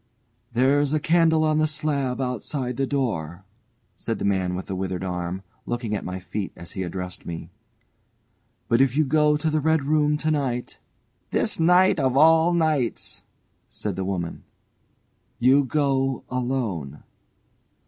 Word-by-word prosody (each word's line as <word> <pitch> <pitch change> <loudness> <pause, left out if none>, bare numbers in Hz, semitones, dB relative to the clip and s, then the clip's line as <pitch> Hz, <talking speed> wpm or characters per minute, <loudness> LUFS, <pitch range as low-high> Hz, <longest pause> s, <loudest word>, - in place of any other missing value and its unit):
"There's 140 +4 +2
a - - +2
candle 160 0 +3
on 155 0 +2
the 155 - +3
slab 145 -4 -1
outside 125 0 -2
the 135 - 0
door," 95 - -2 0.5
said 115 -2 -3
the - - -3
man 95 -2 0
with 95 - -5
the 95 - -4
withered 95 -1 -3
arm, 90 0 -3 0.2
looking 120 -3 -2
at 105 - -2
my 90 +1 -5
feet 95 +2 -5
as 85 - -8
he 95 - -5
addressed 90 0 -5
me. 85 0 -7 1.2
"But 115 +2 +3
if 135 0 +2
you 155 - +4
go 150 +1 +3
to 160 - -2
the 155 - +1
red 160 0 +2
room 150 +1 +2
to 155 +1 -1
night 130 -5 -2 0.2
" - - -45
("This - - 0
night 180 +1 +5
of 130 -1 +1
all 160 +3 +6
nights!" 155 -8 0 0.5
said 105 -3 -4
the 95 - -3
old 95 - -2
woman.) 85 -3 -4 0.9
"You 135 +3 +4
go 135 -2 0
alone." 120 - -3
130 Hz, 160 wpm, -24 LUFS, 95-150 Hz, 1.2 s, all